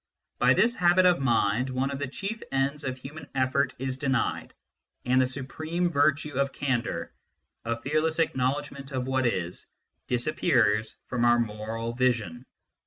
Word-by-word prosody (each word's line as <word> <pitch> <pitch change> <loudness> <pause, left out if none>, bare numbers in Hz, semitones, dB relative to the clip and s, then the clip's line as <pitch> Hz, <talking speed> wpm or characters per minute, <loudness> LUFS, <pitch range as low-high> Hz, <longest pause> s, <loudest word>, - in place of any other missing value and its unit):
By - - +5
this 235 +1 +4
habit 180 -3 +4
of 180 -1 +5
mind 120 -1 +2
one 130 +2 -1
of 140 - -4
the 145 - -2
chief 200 - -5
ends 140 +2 0
of 130 -1 -3
human 145 +3 -10
effort 130 +1 +1
is 130 0 -3
denied, 130 -3 -1 0.5
and 130 +1 +4
the 130 - +2
supreme 155 +6 -2
virtue 145 -1 +1
of 140 -1 +1
candour, 130 -5 -2 0.5
of 115 0 -3
fearless 155 +3 0
acknowledgment 140 -1 -1
of 130 -2 -2
what 130 -1 +1
is, 90 -6 -3 0.4
disappears 120 - +1
from 125 -2 -2
our 120 0 +5
moral 115 +1 -3
vision. 120 0 0
130 Hz, 150 wpm, -27 LUFS, 120-145 Hz, 0.5 s, By